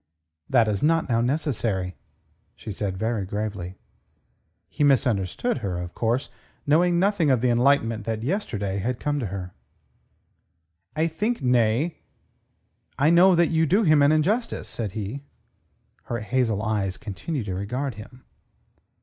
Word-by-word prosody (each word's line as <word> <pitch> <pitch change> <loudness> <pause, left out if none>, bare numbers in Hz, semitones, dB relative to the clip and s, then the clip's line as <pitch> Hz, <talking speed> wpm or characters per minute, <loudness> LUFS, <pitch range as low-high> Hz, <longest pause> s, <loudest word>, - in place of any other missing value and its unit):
"That 120 -4 +4
is 105 -2 -1
not 165 +1 +2
now 115 -1 +2
necessary," 115 - -1 0.6
said 100 -1 -4
she - - -8
very 110 0 -1
gravely. 100 -2 -4 0.9
He 145 - -2
misunderstood 125 - +1
her, 95 -6 -3
of 90 0 -6
course, 120 +4 -1 0.3
knowing 170 +4 +3
nothing 185 -4 +2
of 130 -4 +3
the 125 -1 +2
enlightenment 120 -3 +2
that 110 -1 -3
yesterday 105 - -2
had 120 +5 -2
come 145 -1 -1
to 120 - -2
her. 90 -1 -6 1.4
"I 160 +1 +2
think..., 205 - -2
nay, 125 +5 +2 1.0
I 145 +4 +4
know 180 +2 +6
that 170 -1 +3
you 160 0 +2
do 200 +8 +3
him 155 -5 +5
an 140 +1 +5
injustice," 205 +10 0
said 105 -5 -4
he. 110 +5 -5 0.8
Her 120 -2 -3
hazel 110 -2 0
eyes 100 -4 -1
continued 115 - -5
to 95 - -3
regard 125 +8 -3
him. 110 +5 -12
120 Hz, 140 wpm, -24 LUFS, 105-155 Hz, 1.4 s, know